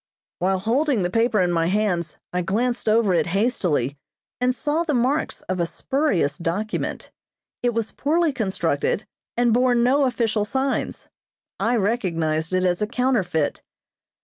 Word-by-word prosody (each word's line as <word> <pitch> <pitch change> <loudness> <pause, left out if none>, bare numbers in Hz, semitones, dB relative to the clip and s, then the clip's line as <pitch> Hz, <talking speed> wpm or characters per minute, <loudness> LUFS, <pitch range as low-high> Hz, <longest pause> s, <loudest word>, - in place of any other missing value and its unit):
While 190 +2 +1
holding 235 +3 +1
the 175 - -1
paper 225 0 +2
in 180 -1 +2
my 165 -1 +1
hands 180 -4 0 0.2
I 180 - +1
glanced 225 +6 0
over 215 -3 +3
it 170 - +2
hastily, 170 - 0 0.4
and 250 0 +1
saw 300 +5 0
the 305 -4 0
marks 260 +6 0
of 185 0 -3
a 170 - +1
spurious 195 - 0
document. 190 +6 -3 0.5
It 245 -2 0
was 230 -1 -1
poorly 320 +2 +1
constructed, 190 - -1 0.3
and 240 -1 +3
bore 250 +1 +3
no 255 +4 +3
official 230 -4 0
signs. 265 +4 -2 0.5
I 235 +2 +2
recognized 170 -8 0
it 185 - +2
as 180 +1 +1
a 210 - +1
counterfeit. 210 - 0
215 Hz, 150 wpm, -23 LUFS, 180-250 Hz, 0.5 s, over